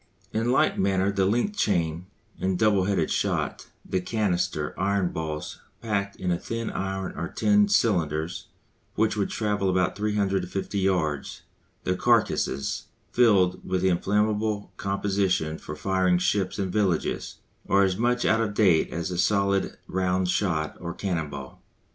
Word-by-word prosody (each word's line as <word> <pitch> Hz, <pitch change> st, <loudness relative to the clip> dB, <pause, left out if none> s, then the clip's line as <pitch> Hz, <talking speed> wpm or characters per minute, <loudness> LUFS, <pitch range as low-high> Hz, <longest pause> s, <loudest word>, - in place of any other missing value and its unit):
In 115 Hz, +2 st, +1 dB
like 130 Hz, -, +2 dB
manner 95 Hz, 0 st, +2 dB
the 95 Hz, -1 st, +1 dB
linked 120 Hz, -, 0 dB
chain 85 Hz, -, 0 dB, 0.3 s
and 95 Hz, -1 st, 0 dB
"double 100 Hz, -2 st, +3 dB
headed" 95 Hz, -5 st, 0 dB
shot, -, -, -1 dB, 0.2 s
the 95 Hz, -, 0 dB
"canister" 95 Hz, -2 st, -1 dB
iron 95 Hz, 0 st, 0 dB
balls 80 Hz, -1 st, -5 dB, 0.2 s
packed 100 Hz, -3 st, -2 dB
in 90 Hz, -1 st, -1 dB
thin 115 Hz, 0 st, -4 dB
iron 95 Hz, 0 st, -3 dB
or 85 Hz, -, -3 dB
tin 105 Hz, +1 st, +3 dB
cylinders 85 Hz, -6 st, 0 dB, 0.5 s
which 110 Hz, 0 st, +2 dB
would 100 Hz, -2 st, 0 dB
travel 105 Hz, -3 st, 0 dB
about 90 Hz, -1 st, +1 dB
350 100 Hz, -2 st, -1 dB
yards 85 Hz, -7 st, -1 dB, 0.4 s
the 90 Hz, -, 0 dB
"carcasses" 70 Hz, -6 st, +1 dB, 0.2 s
filled 100 Hz, -7 st, +3 dB
with 95 Hz, 0 st, -1 dB
inflammable 105 Hz, +3 st, +1 dB
composition 95 Hz, -5 st, 0 dB
for 75 Hz, -, -7 dB
firing 95 Hz, +2 st, +2 dB
ships 95 Hz, +1 st, 0 dB
and 95 Hz, -3 st, -2 dB
villages, 100 Hz, -5 st, 0 dB, 0.3 s
are 100 Hz, 0 st, +5 dB
as 95 Hz, -1 st, +1 dB
much 120 Hz, +3 st, +1 dB
out 110 Hz, +1 st, +3 dB
of 105 Hz, -2 st, -2 dB
date 95 Hz, -7 st, +4 dB
as 85 Hz, +3 st, -3 dB
the 90 Hz, -1 st, -3 dB
solid 100 Hz, 0 st, +1 dB
round 95 Hz, 0 st, 0 dB
shot 85 Hz, -5 st, 0 dB
or 85 Hz, 0 st, -5 dB
cannon 85 Hz, -6 st, -2 dB
ball. -, -, -9 dB
95 Hz, 140 wpm, -26 LUFS, 90-105 Hz, 0.5 s, are